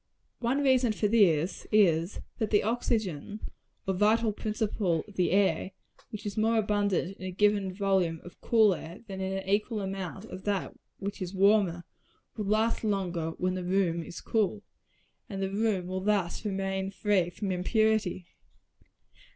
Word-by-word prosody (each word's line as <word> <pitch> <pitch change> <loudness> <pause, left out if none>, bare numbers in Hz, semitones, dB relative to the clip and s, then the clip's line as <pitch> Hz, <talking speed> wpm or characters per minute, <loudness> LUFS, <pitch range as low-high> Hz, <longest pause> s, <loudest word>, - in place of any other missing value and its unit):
One 255 +4 0
reason 255 -4 +4
for 210 - +1
this 185 -6 +2
is, 175 -4 +3 0.2
that 220 - 0
the 205 - +3
oxygen, 215 -5 -1 0.5
or 190 - 0
vital 215 +3 +3
principle 210 -6 -1
of 205 - -14
the 180 - +2
air, 195 0 +2 0.4
which 215 -3 -8
is 205 - -3
more 225 +1 +3
abundant 205 -3 0
in 185 - -8
a - - -2
given 200 0 +2
volume 185 -4 +1
of 175 - -13
cool 220 -4 +4
air 170 +2 -8
than 190 -2 -6
in 190 0 -2
an 190 - -6
equal 210 +3 +1
amount 195 0 -5
of 190 -4 -9
that 200 -2 -1 0.2
which 200 +1 -5
is 185 +1 -4
warmer, 195 -3 +3 0.5
will 215 - -3
last 220 +4 +1
longer 180 -6 -1
when 185 0 0
the 185 -1 -3
room 180 -2 +1
is 170 - -8
cool, 210 -1 0 0.7
and 195 -3 -5
the 195 0 -1
room 205 -3 0
will 185 +1 -3
thus 200 -3 0
remain 195 -1 -2
free 195 -3 +1
from 195 +2 -4
impurity. 210 0 +1
195 Hz, 160 wpm, -29 LUFS, 185-215 Hz, 0.7 s, reason